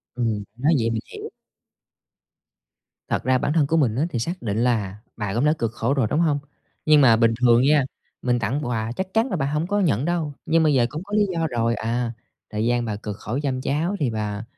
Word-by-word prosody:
Ừm, 115 -4 -1
nói 140 +7 +2
vậy 115 -1 0
mình 115 -1 -1
hiểu. - - -7 1.8
Thật - - -1
ra 130 +1 +3
bản 145 - -1
thân 155 -3 +3
của 160 - +1
mình 125 -8 +2
á 140 - +1
thì 120 - -2
xác 170 +10 -4
định 105 -3 -2
là 105 -6 0 0.2
bà 105 -3 -3
cũng 120 +5 +1
đã 150 - +4
cực 115 -1 -1
khổ 120 +3 0
rồi, 135 -5 +1
đúng 150 - +1
hông? 155 -4 +2 0.5
Nhưng 155 -1 +6
mà 120 -5 +6
bình 115 0 +3
thường 120 -1 +5
nha, 145 0 +4 0.4
mình 125 -1 +1
tặng 120 +6 -1
quà 115 -2 -2
chắc 190 0 -4
chắn 225 +4 +2
là - - 0
bà 135 -4 -1
hông 150 +3 -1
có 205 +2 0
nhận 150 -8 +1
đâu, 165 -3 -1
nhưng 165 0 +3
mà - - +3
bây 150 - +3
giờ 120 -3 +4
cũng 150 +5 -6
có 205 +1 -6
lý 210 -1 +4
do 165 -2 0
rồi: 115 -1 0
"À, 115 +1 -2 0.4
thời 105 +1 -2
gian 120 0 +1
bà 110 -3 -3
cực 105 -1 -6
khổ 115 +5 -4
chăm 130 -3 -1
cháu 155 +9 -1
thì 135 -5 +1
bà 105 -1 -3
125 Hz, 245 wpm, -23 LUFS, 115-155 Hz, 1.8 s, Nhưng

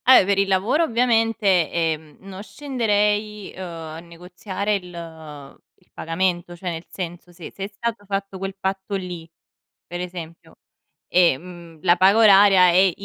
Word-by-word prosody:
Eh, 255 -7 +8
per 200 0 +1
il 200 - +2
lavoro 200 - +2
ovviamente, 225 - +2
ehm, 160 -3 -2
non 190 0 -9
scenderei, 210 -5 -1
uhm, 190 - -9
a 165 -2 -7
negoziare 180 +4 -4
il 160 -6 -9 0.2
il - - -37
pagamento, 175 +1 -2
cioè 180 +1 -5
nel 165 0 -6
senso, 175 -1 -7
se 175 -1 -10
se 195 - -8
è - - -2
stato 210 0 -5
fatto 195 -1 -4
quel 195 0 -5
patto 190 +1 -4
lì, 180 -4 -6 0.6
per 175 +1 -6
esempio, 170 -2 -9 0.5
e, 175 -6 +4
mhmm, 170 -1 -13
la 175 -1 +4
paga 190 +4 +5
oraria 195 -3 +7
è 185 +2 +4
185 Hz, 150 wpm, -22 LUFS, 170-200 Hz, 0.6 s, Eh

